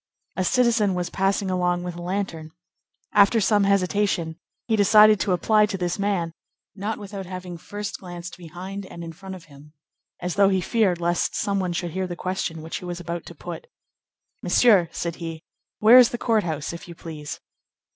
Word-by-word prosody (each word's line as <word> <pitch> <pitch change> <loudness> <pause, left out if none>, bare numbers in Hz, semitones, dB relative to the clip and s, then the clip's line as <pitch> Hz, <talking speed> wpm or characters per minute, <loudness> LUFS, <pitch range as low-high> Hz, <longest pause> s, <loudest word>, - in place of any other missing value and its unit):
A 185 - 0
citizen 230 -3 +2
was 175 -1 -3
passing 195 0 0
along 180 -1 0
with 180 0 -4
a 175 - -7
lantern. 175 -3 -3 0.6
After 205 +3 +5
some 205 -1 +3
hesitation, 190 -4 +1 0.3
he 225 - +1
decided 210 0 +6
to 200 - 0
apply 210 +4 +3
to 195 - -3
this 180 +1 -2
man, 190 -5 -1 0.4
not 205 +3 -3
without 200 -2 -7
having 185 -1 -7
first 205 +5 -6
glanced 175 -1 -8
behind 185 +3 -8
and 170 - -9
in 165 0 -7
front 190 +2 -9
of 180 - -12
him, 150 0 -16 0.5
as 180 0 -3
though 200 -1 +4
he 190 -1 +2
feared 185 -2 +1
lest 175 0 0
some 200 -1 0
one 180 -2 -1
should 175 -1 -3
hear 185 +2 -2
the 175 - -5
question 175 -3 -3
which 165 - -4
he - - -9
was 175 0 -5
about 170 0 -5
to - - -10
put. 485 - -8 0.7
"Monsieur," 200 -9 +4
said 170 -1 -4
he, 165 -2 -6 0.3
"where 230 +4 +8
is 245 - +7
the 240 - -4
court 225 -3 +1
house, 155 -2 -3
if 170 - -9
you 170 - -10
please." 155 -3 -7
185 Hz, 190 wpm, -24 LUFS, 175-205 Hz, 0.7 s, where